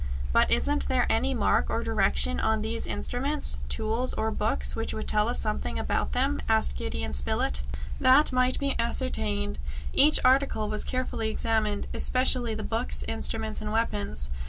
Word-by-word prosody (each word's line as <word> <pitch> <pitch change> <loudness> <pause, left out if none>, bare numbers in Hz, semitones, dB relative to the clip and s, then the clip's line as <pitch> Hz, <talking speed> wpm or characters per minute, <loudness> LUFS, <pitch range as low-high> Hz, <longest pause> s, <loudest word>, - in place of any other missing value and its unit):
"But - - +4
isn't 70 +2 +1
there - - +2
any 65 - +1
mark 65 - +1
or - - -1
direction 65 -2 +2
on 70 - 0
these 75 -2 -3
instruments, 70 -1 -1
tools, 225 - -1
or 220 0 -1
books, 65 - -1
which 65 +3 -3
would 70 -2 -5
tell 65 - +2
us - - -1
something 60 -1 -2
about 65 -1 -1
them?" 70 +2 0
asked 65 -1 +2
Gideon 75 +3 -4
Spilett. 65 0 0 0.4
That 265 +4 +5
might 255 0 +2
be 280 -1 -1
ascertained. 70 - -1 0.3
Each 300 +3 +6
article 255 -5 +2
was 210 0 -2
carefully 255 -4 -2
examined, 215 -2 0
especially 255 -3 +1
the 215 - -5
books, 225 +3 -1
instruments 220 -1 -1
and 210 0 -4
weapons. 70 - -2
75 Hz, 155 wpm, -27 LUFS, -, 0.4 s, Each